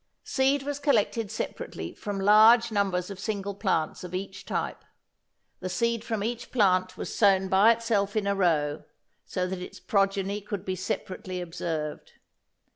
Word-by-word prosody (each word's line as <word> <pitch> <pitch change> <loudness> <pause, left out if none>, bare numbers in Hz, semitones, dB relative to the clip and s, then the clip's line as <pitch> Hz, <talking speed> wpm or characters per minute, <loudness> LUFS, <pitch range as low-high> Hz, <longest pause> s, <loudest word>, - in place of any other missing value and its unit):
Seed 270 +1 +1
was 285 0 -3
collected 230 -6 +1
separately - - -5
from 205 -2 -5
large 220 +4 +6
numbers 195 -3 0
of 195 - -8
single 200 -1 -3
plants 190 -6 -1
of 180 0 -6
each 190 0 -6
type. - - -3 0.8
The 185 - -4
seed 235 +3 0
from 220 -3 -2
each 235 +2 -4
plant 185 -5 +2
was - - -5
sown 195 -2 +4
by 200 +5 +6
itself 220 -3 -1
in 215 -2 +1
a 200 - +2
row, 160 -6 +1 0.4
so 180 -1 -1
that 185 0 -4
its 180 - -8
progeny 195 0 0
could 205 -1 -5
be 185 - -2
separately 185 0 -4
observed. 165 -3 -4
200 Hz, 155 wpm, -27 LUFS, 185-220 Hz, 0.8 s, large